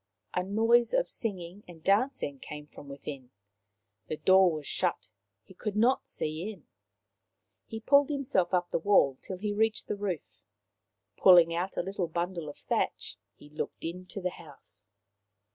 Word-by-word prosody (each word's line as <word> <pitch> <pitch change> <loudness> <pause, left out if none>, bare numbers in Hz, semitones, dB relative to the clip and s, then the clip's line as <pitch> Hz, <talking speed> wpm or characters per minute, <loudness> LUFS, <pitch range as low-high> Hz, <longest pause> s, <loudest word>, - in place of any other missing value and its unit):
A 180 - +1
noise 225 - +3
of - - +2
singing 190 -3 -4
and 165 -3 -13
dancing 200 - +1
came 150 +2 -8
from 145 -1 -13
within. 140 -2 -8 0.8
The 155 - -3
door 185 +3 +5
was 155 -2 -5
shut. 175 -10 -2 0.3
He - - -16
could 210 +2 -4
not 240 +5 +2
see 155 +6 -3
in. 190 -8 -15 1.0
He 220 0 -6
pulled 280 +4 +5
himself 275 -11 0
up 180 -1 0
the - - +1
wall 165 -7 +4
till 190 - -6
he 205 +2 -2
reached 220 +1 +1
the - - -2
roof. 180 - -5 0.7
Pulling 175 -3 +7
out 180 +3 -3
a - - +1
little 190 -1 -2
bundle 170 -1 -3
of 145 - -10
thatch, - - -2 0.2
he 145 - -16
looked 150 - -5
into 180 +4 -5
the 180 0 -1
house. 135 - -15
180 Hz, 160 wpm, -29 LUFS, 155-205 Hz, 1.0 s, Pulling